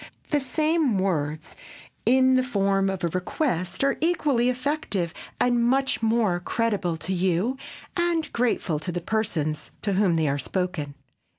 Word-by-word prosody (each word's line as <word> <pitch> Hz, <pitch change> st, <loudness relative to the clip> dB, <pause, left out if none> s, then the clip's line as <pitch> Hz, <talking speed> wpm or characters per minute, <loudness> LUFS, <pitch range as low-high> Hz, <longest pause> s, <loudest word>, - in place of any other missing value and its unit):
The 295 Hz, -, +3 dB
same 305 Hz, -2 st, +1 dB
words 155 Hz, -5 st, -1 dB
put -, -, -18 dB, 0.5 s
in 260 Hz, +1 st, +5 dB
the 255 Hz, -, +4 dB
form 195 Hz, -5 st, +1 dB
of 190 Hz, -2 st, -4 dB
a -, -, +3 dB
request 185 Hz, -, -1 dB
are 275 Hz, 0 st, +2 dB
equally 300 Hz, -8 st, +2 dB
effective 255 Hz, -, -1 dB, 0.3 s
and 245 Hz, 0 st, +3 dB
are -, -, +2 dB
much 265 Hz, +3 st, +2 dB
more 220 Hz, -5 st, +2 dB
creditable 200 Hz, -4 st, -1 dB
to 160 Hz, +5 st, -3 dB
you 185 Hz, +7 st, +1 dB, 0.4 s
and 345 Hz, -2 st, 0 dB
grateful 225 Hz, -10 st, 0 dB
to 175 Hz, +4 st, -3 dB
the 175 Hz, -, -2 dB
persons 170 Hz, -6 st, -2 dB
to 200 Hz, -, +1 dB
whom 190 Hz, -3 st, +3 dB
they 160 Hz, -2 st, +1 dB
are 140 Hz, 0 st, 0 dB
spoken. 165 Hz, -2 st, -3 dB
205 Hz, 160 wpm, -25 LUFS, 175-255 Hz, 0.5 s, in